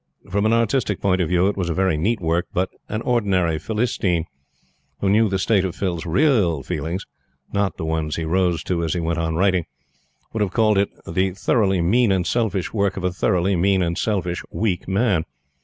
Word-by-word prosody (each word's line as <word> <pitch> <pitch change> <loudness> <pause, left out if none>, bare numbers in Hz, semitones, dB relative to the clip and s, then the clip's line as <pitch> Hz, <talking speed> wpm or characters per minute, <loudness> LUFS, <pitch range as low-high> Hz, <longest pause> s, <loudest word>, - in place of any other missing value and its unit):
From 100 +3 +2
an 110 - +2
artistic 115 -3 +1
point 95 -2 +1
of 85 - 0
view, 90 +1 +3
it 100 - 0
was 90 -3 -2
very 95 0 +1
neat 105 +9 0
work, 85 +1 0
but 95 +1 0 0.2
an 110 +2 -3
ordinary 95 -9 +1
Philistine, 105 -7 -1 0.7
who 95 - +1
knew 110 +1 +4
the 95 - 0
state 100 0 +2
of 95 -2 -3
Phil's 85 -4 -3
real 90 - +2
feelings 85 +8 -3 0.5
not 100 -2 0
the - - -4
ones 80 -1 -1
he 80 - -3
rose 90 -1 +1
to 85 -2 -1
as 80 0 -1
he - - 0
went 85 0 -1
on 80 -1 -1
writing 90 -1 +2 0.7
would 110 - -2
have 95 -3 0
called 110 -3 +3
it 100 - +1 0.2
the 95 +2 0
thoroughly 95 -1 +1
mean 110 +6 +3
and 95 -2 +1
selfish 105 -6 -1
work 100 -3 0
of 95 - -4
a 90 -1 0
thoroughly 90 +1 +1
mean 95 +1 +2
and 85 0 -1
selfish, 90 -5 -1
weak 100 -5 -2
man. 100 -3 +1
95 Hz, 200 wpm, -22 LUFS, 85-105 Hz, 0.7 s, knew